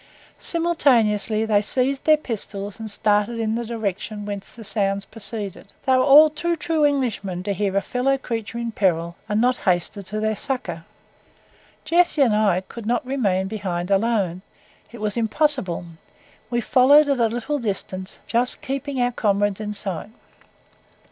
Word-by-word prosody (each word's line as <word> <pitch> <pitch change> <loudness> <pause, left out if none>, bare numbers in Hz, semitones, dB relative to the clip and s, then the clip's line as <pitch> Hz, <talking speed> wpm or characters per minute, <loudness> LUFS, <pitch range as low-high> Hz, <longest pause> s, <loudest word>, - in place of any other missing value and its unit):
Simultaneously 230 - +2
they 210 -2 +3
seized 265 +5 -1
their 310 -1 +6
pistols, 205 -6 -5
and 220 -1 -6
started 210 +2 +1
in 220 -1 -1
the 235 +1 -2
direction 215 -2 -4
whence 200 -1 -6
the 225 - -10
sounds 195 -2 -1
proceeded. 210 -3 -5
They 265 - +2
were 255 - +4
all 290 +3 +8
too 340 +3 -1
true 320 -1 0
Englishmen 230 -11 0
to 200 +1 -1
hear 195 0 -1
a 200 - +1
fellow 270 +2 0
creature 230 -3 -5
in 235 -1 -3
peril 170 -5 0
and 210 +1 +1
not 250 +2 +2
hasten 180 +1 0
to 210 +3 -4
their 220 0 0
succour. 195 -10 -4 1.0
Jessie 335 -2 +3
and 240 - +3
myself 200 -4 +1
could 230 -2 -8
not 245 +1 0
remain 205 -8 0
behind 190 -3 -4
alone 195 -4 +1 0.5
it 235 - -10
was 210 +1 -2
impossible; 230 - 0 0.6
we 240 -1 0
followed 280 +6 +5
at 280 -3 +1
a 230 - +4
little 245 +6 -3
distance, 190 -4 -5
just 245 +5 +3
keeping 275 -1 -3
our 245 0 +2
comrades 205 -2 0
in 210 -1 -4
sight. 200 -2 -4
220 Hz, 160 wpm, -22 LUFS, 200-255 Hz, 1.0 s, all